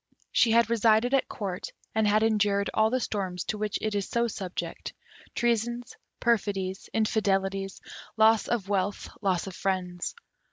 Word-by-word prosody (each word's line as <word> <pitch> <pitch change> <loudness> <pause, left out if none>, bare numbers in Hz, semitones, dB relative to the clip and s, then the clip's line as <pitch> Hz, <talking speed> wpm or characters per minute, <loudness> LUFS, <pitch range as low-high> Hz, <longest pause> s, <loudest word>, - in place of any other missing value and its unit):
She 235 - +4
had 230 +1 +5
resided 225 +2 +3
at 275 - +2
Court, 190 -4 -4 0.2
and 220 -1 +2
had 215 +1 +3
endured 205 -2 +2
all 220 0 +3
the 255 +2 +1
storms 190 -6 -2
to 215 - -3
which 210 -1 -1
it 215 -1 0
is 200 -1 -2
so 235 0 +1
subject: 190 -4 -5 0.4
treasons, 240 0 0 0.2
perfidies, 195 -5 0
infidelities, 195 -3 0 0.4
loss 220 0 +5
of 225 -5 -1
wealth, 200 0 -1
loss 185 -4 +1
of 190 -3 -7
friends. 185 -2 -2
210 Hz, 150 wpm, -28 LUFS, 195-225 Hz, 0.4 s, had